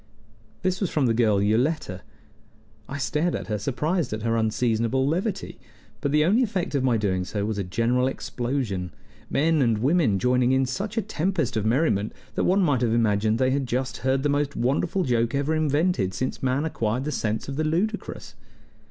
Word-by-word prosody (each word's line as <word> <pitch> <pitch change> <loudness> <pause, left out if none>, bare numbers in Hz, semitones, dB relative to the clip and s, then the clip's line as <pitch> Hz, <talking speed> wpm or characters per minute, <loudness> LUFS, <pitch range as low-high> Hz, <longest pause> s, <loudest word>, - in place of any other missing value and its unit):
This 185 +1 0
was 190 - +1
from 145 -4 +1
the 115 - +3
girl 110 -3 +3
Yoletta. 110 - 0 0.9
I 145 - -4
stared 150 +5 0
at - - -4
her, 105 -1 -1
surprised 150 - -1
at 110 0 -4
her 115 0 +1
unseasonable 115 +3 +1
levity; 185 +7 -2 0.4
but 140 - 0
the 150 +1 +4
only 210 +9 +3
effect 200 - -1
of 140 -2 +1
my 125 -3 +3
doing 95 -4 0
so 100 +2 -3
was 105 -1 -2
a - - 0
general 115 +7 +1
explosion, 120 -8 -3 0.4
men 160 +1 +2
and 115 -4 +2
women 130 - +2
joining 125 +3 +2
in 130 0 +3
such 195 - -4
a 225 - +1
tempest 180 - -1
of 110 -1 0
merriment 115 -5 +1 0.2
that - - 0
one 195 +2 +3
might 145 -7 +2
have 115 -2 +1
imagined 110 -1 +2
they 130 +1 +2
had 135 -1 0
just 125 +2 -2
heard 130 +1 0
the - - +2
most 145 0 0
wonderful 155 +9 0
joke 120 -2 +1
ever 140 +3 0
invented 150 - +1
since 130 +6 -3
man 130 +3 0
acquired 120 -5 -1
the 150 - -2
sense 110 -5 -2
of 135 - -4
the 155 - 0
ludicrous. 185 +8 -2
130 Hz, 190 wpm, -25 LUFS, 115-155 Hz, 0.9 s, the